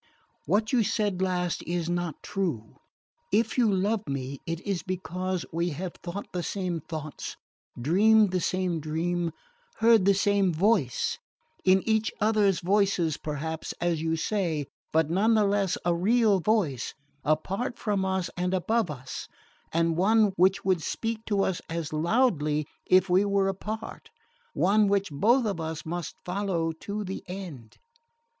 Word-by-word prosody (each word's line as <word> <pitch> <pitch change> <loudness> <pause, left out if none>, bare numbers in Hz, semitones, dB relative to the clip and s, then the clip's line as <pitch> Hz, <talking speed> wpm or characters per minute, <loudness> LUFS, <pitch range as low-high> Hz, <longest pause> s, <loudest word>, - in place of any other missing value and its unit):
What 215 - +1
you 245 - +5
said 205 -3 0
last 180 -2 0
is 170 -1 -1
not 175 -3 -3
true. 160 - -3 0.5
If 220 +3 +2
you 235 -4 +3
love 205 +3 0
me 135 0 -4
it 165 0 -2
is 195 -4 -2
because 185 0 -3
we 170 +2 0
have 185 0 -3
thought 180 +3 -5
the 180 - -1
same 180 -2 -2
thoughts, 155 -1 -6 0.4
dreamed 205 - +4
the 185 - +1
same 185 -2 0
dream, 165 +3 -1 0.4
heard 225 -4 +5
the 200 0 +5
same 200 -1 +2
voice 170 - +1 0.4
in 190 +2 +4
each 220 0 +2
other's 210 -3 +3
voices, 190 -4 +2
perhaps, 155 +2 -4
as 170 -2 0
you 160 0 0
say, 165 -4 -1 0.3
but 160 0 +2
none 215 +6 +3
the 215 - +4
less 200 -2 +1
a 175 - +3
real 205 +3 +3
voice, 175 - 0 0.3
apart 195 - -1
from 205 -3 0
us 190 -2 -1
and 180 +1 0
above 220 +2 +1
us, 130 -3 -6 0.4
and 165 0 +1
one 210 +2 +4
which 190 +1 +3
would 185 -3 +2
speak 225 +6 -3
to 200 -2 +2
us 185 - -1
as 165 -2 -3
loudly 155 - +2 0.2
if 185 +1 +5
we 185 +2 +4
were 200 -1 +2
apart 210 +3 -5 0.5
one 205 +3 +4
which 200 -3 +1
both 225 - +3
of 195 -6 -2
us 160 -1 -5
must 170 +1 -4
follow 180 -3 -1
to 200 +6 -5
the 190 0 -5
end." 175 - -8
185 Hz, 150 wpm, -27 LUFS, 165-205 Hz, 0.5 s, you